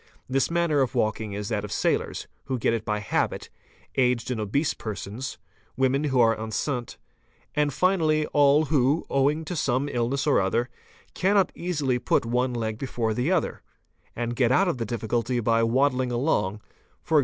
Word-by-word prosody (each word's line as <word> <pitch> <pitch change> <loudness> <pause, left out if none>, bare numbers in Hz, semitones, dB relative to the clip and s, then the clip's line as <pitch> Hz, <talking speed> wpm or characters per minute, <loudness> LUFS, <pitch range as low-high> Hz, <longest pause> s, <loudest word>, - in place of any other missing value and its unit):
This 135 +1 +1
manner 170 -4 +2
of 130 - -1
walking 110 -1 -1
is 105 0 -4
that - - -1
of - - -6
sailors, - - -1 0.2
who 130 -1 -2
get 115 - +1
it 115 -2 -2
by 105 -1 -1
habit, 105 - -2 0.4
aged 125 -2 +1
and 115 -3 -2
obese 140 +9 0
persons, 110 +4 -6 0.4
woman 135 +3 +2
who 135 -3 +1
are 115 -1 +5
enceinte, 115 +3 -3 0.6
and 150 -1 +2
finally 155 -1 +2
all 145 +1 +5
who, 145 +1 +2
owing 145 +4 +2
to 180 - -4
some 135 -2 0
illness 130 +2 -1
or 145 - +3
other, 115 +6 0 0.4
cannot 195 0 +2
easily 145 -8 -1
put - - +1
one 125 +2 0
leg 110 -2 -3
before 120 -4 -2
the 125 +10 0
other, 185 -4 0 0.5
and 120 0 -3
get 125 -1 +2
out 185 +9 +4
of 165 -8 -1
the 115 - -1
difficulty 120 +2 -1
by 115 0 +2
waddling 130 +2 +2
along, 105 -6 0 0.5
e.g. 155 - +6
130 Hz, 170 wpm, -26 LUFS, 115-145 Hz, 0.6 s, e.g